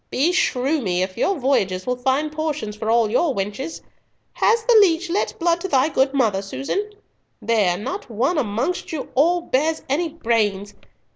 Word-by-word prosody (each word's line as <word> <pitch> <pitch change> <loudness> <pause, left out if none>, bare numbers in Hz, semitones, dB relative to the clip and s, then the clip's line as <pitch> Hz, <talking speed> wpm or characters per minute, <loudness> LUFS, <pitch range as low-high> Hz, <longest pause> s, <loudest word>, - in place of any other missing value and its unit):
Beshrew 285 -2 +1
me, 180 -4 0
if 185 0 -5
your 395 - +1
voyages 195 -9 0
will 250 - 0
find 265 +4 0
portions 300 -8 -3
for 220 +1 -4
all 225 -2 +3
your 280 +3 +1
wenches! 210 +11 -4 0.5
Has 455 0 +2
the 480 0 +3
leech 350 -2 +2
let 395 - -1
blood 340 0 +1
to 380 - -3
thy 275 -3 +2
good 270 -2 +2
mother, 225 -8 +1
Susan? 195 - -3 0.5
There! 205 -6 +1
not 365 - -6
one 260 +9 0
amongst 245 - -2
you 310 -4 -5
all 340 +6 +3
bears 315 +1 0
any 320 +5 0
brains. 215 -9 -1
265 Hz, 165 wpm, -21 LUFS, 215-330 Hz, 0.5 s, all